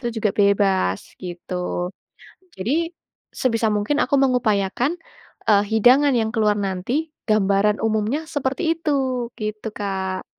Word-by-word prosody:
itu 240 Hz, -, -5 dB
juga 215 Hz, -1 st, +1 dB
bebas 195 Hz, -, +2 dB, 0.2 s
gitu. 180 Hz, 0 st, -4 dB, 0.6 s
Jadi 305 Hz, -, -1 dB, 0.4 s
sebisa 230 Hz, -3 st, +1 dB
mungkin 210 Hz, +7 st, 0 dB
aku 280 Hz, -, +2 dB
mengupayakan, 250 Hz, -, +1 dB, 0.5 s
eee, 205 Hz, -1 st, +5 dB
hidangan 255 Hz, +6 st, +5 dB
yang 220 Hz, -2 st, +1 dB
keluar 210 Hz, -2 st, +2 dB
nanti, 220 Hz, -, -2 dB, 0.2 s
gambaran 210 Hz, 0 st, +3 dB
umumnya 220 Hz, +7 st, 0 dB
seperti 305 Hz, +2 st, -1 dB
itu, 265 Hz, -6 st, -1 dB
gitu 215 Hz, +1 st, -4 dB
Kak. 190 Hz, -2 st, -3 dB
215 Hz, 115 wpm, -22 LUFS, 200-265 Hz, 0.6 s, eee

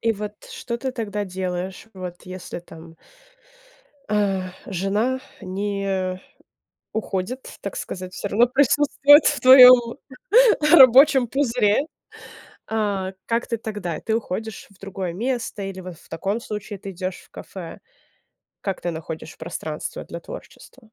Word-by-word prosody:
И 230 Hz, 0 st, +2 dB
вот 210 Hz, 0 st, -8 dB
что 235 Hz, -1 st, -6 dB
ты 260 Hz, 0 st, -3 dB
тогда 210 Hz, -4 st, -3 dB
делаешь, 185 Hz, +1 st, -5 dB
вот 180 Hz, -2 st, -8 dB
если 185 Hz, -1 st, -7 dB
там 165 Hz, -1 st, -14 dB, 1.1 s
э, 195 Hz, -3 st, 0 dB, 0.2 s
жена 205 Hz, +8 st, -1 dB, 0.2 s
не 190 Hz, -1 st, -2 dB, 0.7 s
уходит, 220 Hz, +4 st, -4 dB
так 200 Hz, -, -6 dB
сказать, 185 Hz, -1 st, -6 dB
всё 205 Hz, -, -4 dB
равно 230 Hz, +5 st, +4 dB
присутствует 290 Hz, +2 st, +5 dB
в 295 Hz, -, +2 dB
твоём 255 Hz, -1 st, +8 dB, 0.7 s
рабочем 265 Hz, -2 st, +8 dB
пузыре. 235 Hz, -5 st, +2 dB, 0.9 s
А 200 Hz, -4 st, -1 dB
как 230 Hz, +1 st, -1 dB
ты 230 Hz, -, -2 dB
тогда? 205 Hz, -8 st, -5 dB
Ты 220 Hz, 0 st, -1 dB
уходишь 220 Hz, 0 st, -5 dB
в 200 Hz, -, -23 dB
другое 195 Hz, -3 st, -5 dB
место 235 Hz, 0 st, -3 dB
или 195 Hz, -1 st, -6 dB
вот 180 Hz, -2 st, -9 dB
в -, -, -21 dB
таком 195 Hz, +7 st, -2 dB
случае 210 Hz, -2 st, -6 dB
ты 195 Hz, -, -7 dB
идёшь 185 Hz, 0 st, -5 dB
в -, -, -22 dB
кафе? 175 Hz, -4 st, -9 dB, 0.8 s
Как 195 Hz, -2 st, -3 dB
ты 175 Hz, -, -2 dB
находишь 160 Hz, 0 st, -7 dB
пространство 160 Hz, -2 st, -6 dB
для 170 Hz, -, -8 dB
творчества? 220 Hz, -, -12 dB
200 Hz, 130 wpm, -23 LUFS, 185-235 Hz, 1.1 s, твоём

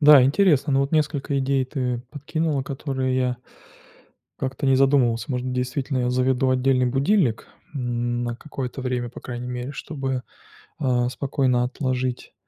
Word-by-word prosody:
Да, 145 Hz, -3 st, +9 dB
интересно, 145 Hz, -1 st, +3 dB
но 135 Hz, -, +4 dB
вот 140 Hz, +2 st, -1 dB
несколько 145 Hz, -2 st, +1 dB
идей 135 Hz, 0 st, +1 dB
ты 125 Hz, -2 st, -2 dB
подкинула, 150 Hz, 0 st, -1 dB
которые 135 Hz, -2 st, -2 dB
я 125 Hz, -1 st, +1 dB, 1.0 s
Как-то 135 Hz, +2 st, -2 dB
не 135 Hz, -1 st, +5 dB
задумывался. 130 Hz, -4 st, +3 dB
Может, 125 Hz, 0 st, -2 dB
действительно, 130 Hz, +2 st, -1 dB
я 125 Hz, 0 st, +1 dB
заведу 130 Hz, +1 st, +2 dB
отдельный 130 Hz, 0 st, +3 dB
будильник, 135 Hz, -, +2 dB, 0.3 s
м, 120 Hz, -2 st, -1 dB
на 120 Hz, 0 st, -3 dB
какое-то 135 Hz, -2 st, -6 dB
время, 125 Hz, -1 st, -1 dB
по 120 Hz, -, -10 dB
крайней 120 Hz, -1 st, -6 dB
мере, 125 Hz, +3 st, -4 dB
чтобы, 135 Hz, -4 st, -3 dB, 0.6 s
а, 125 Hz, -3 st, +1 dB
спокойно 130 Hz, -2 st, +1 dB
отложить, 130 Hz, -1 st, -2 dB
130 Hz, 145 wpm, -24 LUFS, 125-140 Hz, 1.0 s, Да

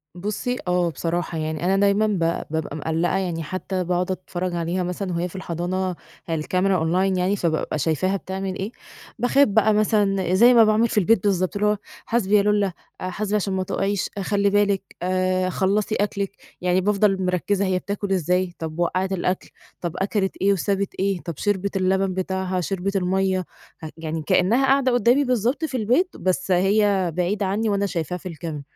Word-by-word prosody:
بُصي 215 Hz, +7 st, -3 dB
آه، 180 Hz, -1 st, +2 dB
بصراحة 170 Hz, 0 st, -3 dB
يعني 155 Hz, +1 st, -3 dB
أنا 195 Hz, +1 st, +3 dB
دايمًا 200 Hz, +2 st, +3 dB
ب 205 Hz, -4 st, 0 dB, 0.3 s
بابقى 160 Hz, -2 st, -2 dB
مقلّقة 165 Hz, +4 st, 0 dB
يعني، 170 Hz, -4 st, -2 dB
حتى 185 Hz, +3 st, -3 dB
باقعد 180 Hz, +1 st, 0 dB
أتفرّج 180 Hz, -1 st, -4 dB
عليها 170 Hz, +2 st, -1 dB
مثلًا 180 Hz, +1 st, -3 dB
وهي 170 Hz, +1 st, -1 dB
في 180 Hz, -, -13 dB
الحضانة، 185 Hz, +1 st, -2 dB, 0.3 s
هي 165 Hz, -2 st, -2 dB
الCamera 185 Hz, +2 st, +1 dB
Online 185 Hz, +3 st, +1 dB
يعني، 185 Hz, +3 st, +1 dB
فبابقى 160 Hz, -4 st, -1 dB
شايفاها 170 Hz, +6 st, +1 dB
بتعمل 190 Hz, 0 st, -4 dB
إيه، 200 Hz, +4 st, -3 dB, 0.5 s
باخاف 270 Hz, +4 st, +4 dB
بقى 215 Hz, +1 st, +3 dB
مثلًا 200 Hz, -4 st, +2 dB
زي 240 Hz, +6 st, +7 dB
ما 230 Hz, -, +7 dB
باعمل 215 Hz, +2 st, +3 dB
في -, -, -4 dB
البيت 205 Hz, +1 st, +3 dB
بالضبط، 185 Hz, -2 st, +1 dB
اللي 210 Hz, +1 st, +1 dB
هو 210 Hz, 0 st, +2 dB, 0.3 s
"حاسْبي 210 Hz, -3 st, +1 dB
يا -, -, +4 dB
لولّا، 205 Hz, -2 st, +2 dB, 0.3 s
آآ 185 Hz, -, -2 dB
حاسْبي 210 Hz, +2 st, -2 dB
عشان 200 Hz, -2 st, 0 dB
ما 190 Hz, 0 st, 0 dB
تقعيش، 195 Hz, +1 st, -1 dB
خلّي 200 Hz, +1 st, +1 dB
بالِك، 205 Hz, -1 st, +1 dB
آآ 185 Hz, 0 st, +1 dB
خلّصي 200 Hz, +4 st, 0 dB
أكلِك." 200 Hz, -1 st, -1 dB, 0.3 s
يعني 180 Hz, +1 st, +2 dB
بافضل 195 Hz, -1 st, +2 dB
مركّزة 190 Hz, +2 st, 0 dB
هي 185 Hz, -1 st, +1 dB
بتاكل 200 Hz, 0 st, -4 dB
إزاي، 180 Hz, 0 st, +1 dB
طَب 160 Hz, 0 st, -5 dB
وقّعِت 185 Hz, +2 st, 0 dB
الأكل، 180 Hz, 0 st, -2 dB, 0.3 s
طَب 175 Hz, -1 st, -3 dB
أكلِت 195 Hz, 0 st, -1 dB
إيه 200 Hz, +1 st, +4 dB
وسابِت 200 Hz, +1 st, -1 dB
إيه، 195 Hz, -1 st, 0 dB
طَب 170 Hz, -, -5 dB
شربِت 200 Hz, -1 st, -1 dB
اللبن 190 Hz, 0 st, +1 dB
بتاعها، 185 Hz, 0 st, -2 dB
شربِت 195 Hz, +2 st, -2 dB
المَيَّة، 190 Hz, 0 st, +1 dB, 0.5 s
يعني 160 Hz, 0 st, -4 dB
كأنها 230 Hz, -, +3 dB
قاعدة 270 Hz, -1 st, +3 dB
قدامي 245 Hz, +4 st, +4 dB
بالضبط 250 Hz, +4 st, 0 dB
في 260 Hz, -4 st, -3 dB
البيت، 250 Hz, -, +1 dB
بس 185 Hz, 0 st, -1 dB
هي 195 Hz, -1 st, +3 dB
بعيدة 195 Hz, +3 st, 0 dB
عنّي، 215 Hz, +4 st, 0 dB
وأنا 200 Hz, 0 st, +1 dB
شايفاها 180 Hz, -2 st, -3 dB
في 185 Hz, -, -8 dB
الCamera، 160 Hz, -3 st, -6 dB
190 Hz, 175 wpm, -23 LUFS, 180-205 Hz, 0.5 s, زي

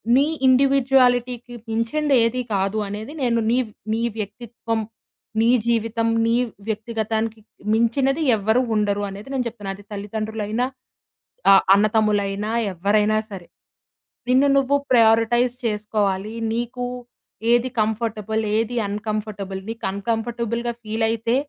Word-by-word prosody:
నీ 275 Hz, +2 st, +5 dB, 0.2 s
ఇండివిడ్యువాలిటీకి 255 Hz, -2 st, +3 dB, 0.2 s
మించింది 270 Hz, +6 st, +1 dB
ఏది 235 Hz, +2 st, 0 dB
కాదు 195 Hz, +2 st, 0 dB
అనేది 215 Hz, +7 st, -6 dB
నేను 235 Hz, -2 st, +2 dB
నీ 240 Hz, -, +3 dB, 0.4 s
నీ 225 Hz, -, -1 dB, 0.2 s
వ్యక్తిత్వం, 225 Hz, +1 st, -4 dB, 0.6 s
నీ 230 Hz, -, +4 dB, 0.2 s
జీవితం, 230 Hz, 0 st, +1 dB, 0.2 s
నీ 230 Hz, 0 st, +2 dB, 0.3 s
వ్యక్తిగతానికి 220 Hz, 0 st, -2 dB, 0.3 s
మించినది 265 Hz, +6 st, +2 dB
ఎవ్వరు 220 Hz, +5 st, +2 dB
ఉండరు 205 Hz, -1 st, +1 dB
అనేది 200 Hz, +6 st, -9 dB
నేను 255 Hz, -2 st, -1 dB
చెప్తున్నా. 210 Hz, -4 st, -6 dB
అది 200 Hz, +1 st, -15 dB
తల్లిదండ్రులైనా, 215 Hz, +2 st, -3 dB, 0.9 s
ఆహ్, 195 Hz, -, +7 dB
అన్న 205 Hz, +1 st, +4 dB
తమ్ములైనా, 210 Hz, -1 st, +1 dB, 0.2 s
ఎవ్వరైనా 210 Hz, +4 st, +2 dB
సరే. 185 Hz, -3 st, -8 dB, 0.8 s
నిన్ను 260 Hz, +3 st, +5 dB
నువ్వు 275 Hz, +1 st, +2 dB, 0.2 s
ప్రయారిటైజ్ 235 Hz, +1 st, +4 dB
చేసుకోవాలి. 210 Hz, -1 st, -1 dB, 0.2 s
నీకు, 240 Hz, +1 st, -3 dB, 0.7 s
ఏది 240 Hz, +1 st, +3 dB
కంఫర్టబుల్ 220 Hz, 0 st, -1 dB, 0.2 s
ఏది 230 Hz, +2 st, -1 dB
అన్‌కంఫర్టబుల్ 205 Hz, -2 st, -4 dB
నీకు 225 Hz, 0 st, -5 dB
అన్‌కంఫర్టబుల్‌గా 235 Hz, +3 st, -2 dB
ఫీల్ 220 Hz, +1 st, -1 dB
అయితే, 230 Hz, +1 st, 0 dB
225 Hz, 110 wpm, -22 LUFS, 210-240 Hz, 0.9 s, ఆహ్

